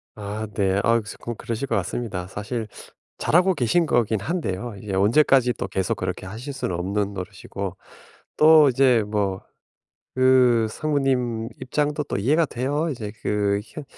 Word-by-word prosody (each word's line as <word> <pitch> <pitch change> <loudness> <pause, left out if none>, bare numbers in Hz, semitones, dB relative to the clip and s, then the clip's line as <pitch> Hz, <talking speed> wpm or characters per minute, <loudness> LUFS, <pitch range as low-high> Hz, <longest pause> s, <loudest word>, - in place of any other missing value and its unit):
아 105 +1 -5
네. 95 -2 +1
아 115 +1 +3
쪼끔 120 +2 -7
그러실 120 +4 -4
것 - - 0
같습니다. 95 -1 -3
사실 105 +4 -4 0.5
잘하고 185 +3 +3
계신 160 +5 +2
거긴 115 -6 +1
한데요. 120 - -3
이게 100 0 -6
언제까지 125 +4 +4
또 - - -4
계속 95 -1 -1
그렇게 - - -4
하실 115 +9 -7
수는 110 -9 -3
없는 100 +3 -2
노릇이고 95 0 -6 0.6
또 155 -1 +7
이제 125 -3 +4
뭐 100 -3 -1 0.8
그 130 -3 +4
상무님 125 -6 -1
입장도 150 +3 -1
또 - - -3
이해가 145 +12 +2
돼요. 145 +7 -1
이제 110 -6 -5
그 100 -1 +1
현 150 +5 -9
115 Hz, 290 characters per minute, -23 LUFS, 100-135 Hz, 0.8 s, 또